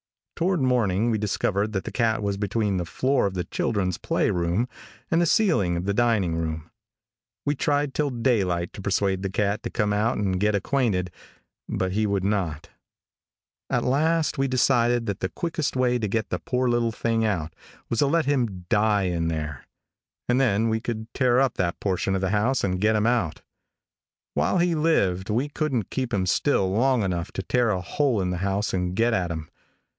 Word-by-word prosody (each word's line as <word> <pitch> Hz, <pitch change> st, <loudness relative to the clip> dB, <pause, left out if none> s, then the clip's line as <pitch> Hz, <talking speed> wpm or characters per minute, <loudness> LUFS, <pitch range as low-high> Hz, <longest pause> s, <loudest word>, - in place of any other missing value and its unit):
Toward 180 Hz, +1 st, +1 dB
morning 120 Hz, -4 st, +2 dB
we 110 Hz, -, 0 dB
discovered 105 Hz, 0 st, -1 dB
that 95 Hz, -, -1 dB
the -, -, -6 dB
cat 115 Hz, -3 st, +1 dB
was 100 Hz, -1 st, 0 dB
between 100 Hz, 0 st, -1 dB
the 90 Hz, -, -2 dB
floor 130 Hz, +5 st, +1 dB
of 95 Hz, -, -5 dB
the 90 Hz, -, -1 dB
children's 95 Hz, -5 st, -1 dB
play -, -, 0 dB
room 90 Hz, +7 st, 0 dB, 0.4 s
and 165 Hz, +1 st, +3 dB
the 170 Hz, -, +2 dB
ceiling 155 Hz, -, +2 dB
of 85 Hz, -, -3 dB
the 100 Hz, -, 0 dB
dining 105 Hz, -7 st, +2 dB
room. 80 Hz, -1 st, -4 dB, 0.7 s
We 145 Hz, -, +2 dB
tried 145 Hz, -1 st, 0 dB
till 150 Hz, -1 st, 0 dB
daylight 105 Hz, -9 st, 0 dB
to 100 Hz, -, -8 dB
persuade 95 Hz, -1 st, 0 dB
the 95 Hz, -, -2 dB
cat 100 Hz, +2 st, 0 dB
to -, -, -4 dB
come 105 Hz, -2 st, 0 dB
out 110 Hz, +3 st, +1 dB
and 95 Hz, -3 st, 0 dB
get 105 Hz, +1 st, +2 dB
acquainted, 100 Hz, -5 st, 0 dB, 0.6 s
but 95 Hz, 0 st, -1 dB
he 105 Hz, +2 st, +1 dB
would 100 Hz, -2 st, 0 dB
not. 85 Hz, -5 st, -1 dB, 1.0 s
At -, -, +1 dB
last 155 Hz, +3 st, +1 dB
we 135 Hz, -, +2 dB
decided 120 Hz, -2 st, +2 dB
that 100 Hz, -3 st, -3 dB
the 95 Hz, -, -2 dB
quickest 165 Hz, -5 st, -3 dB
way 125 Hz, -1 st, +2 dB
to 110 Hz, -, -1 dB
get 110 Hz, +2 st, -1 dB
the 90 Hz, -, -1 dB
poor 125 Hz, +9 st, -1 dB
little 120 Hz, -1 st, +1 dB
thing 115 Hz, 0 st, 0 dB
out 85 Hz, -7 st, -1 dB, 0.3 s
was 115 Hz, -, -2 dB
to 145 Hz, -, +4 dB
let 165 Hz, +1 st, +2 dB
him 120 Hz, -10 st, -1 dB
die 105 Hz, -1 st, +3 dB
in 85 Hz, -3 st, -1 dB
there, 75 Hz, -5 st, -4 dB, 0.6 s
and 125 Hz, +2 st, +2 dB
then 115 Hz, -2 st, +2 dB
we 110 Hz, 0 st, 0 dB
could 110 Hz, -1 st, -4 dB
tear 125 Hz, -2 st, +3 dB
up 135 Hz, -3 st, +2 dB
that 85 Hz, -2 st, -1 dB
portion 95 Hz, 0 st, 0 dB
of 95 Hz, -, -1 dB
the 95 Hz, -1 st, 0 dB
house 110 Hz, +6 st, +1 dB
and 90 Hz, -1 st, -1 dB
get 110 Hz, +1 st, +3 dB
him 105 Hz, 0 st, +1 dB
out. 115 Hz, -10 st, 0 dB, 0.9 s
While -, -, +1 dB
he 175 Hz, 0 st, +2 dB
lived 100 Hz, -, +1 dB
we 125 Hz, +7 st, 0 dB
couldn't 140 Hz, -, -2 dB
keep 130 Hz, -2 st, -2 dB
him 95 Hz, -2 st, 0 dB
still 95 Hz, -1 st, +1 dB
long 125 Hz, +3 st, +2 dB
enough 90 Hz, -2 st, -2 dB
to 95 Hz, -, -3 dB
tear 120 Hz, +3 st, +1 dB
a 95 Hz, -3 st, 0 dB
hole 125 Hz, -, 0 dB
in 90 Hz, -1 st, -1 dB
the 90 Hz, -, -2 dB
house 100 Hz, +3 st, -1 dB
and 90 Hz, -1 st, -1 dB
get 115 Hz, +3 st, +2 dB
at 90 Hz, -5 st, 0 dB
him. 80 Hz, -2 st, -5 dB
105 Hz, 200 wpm, -25 LUFS, 95-125 Hz, 1.0 s, to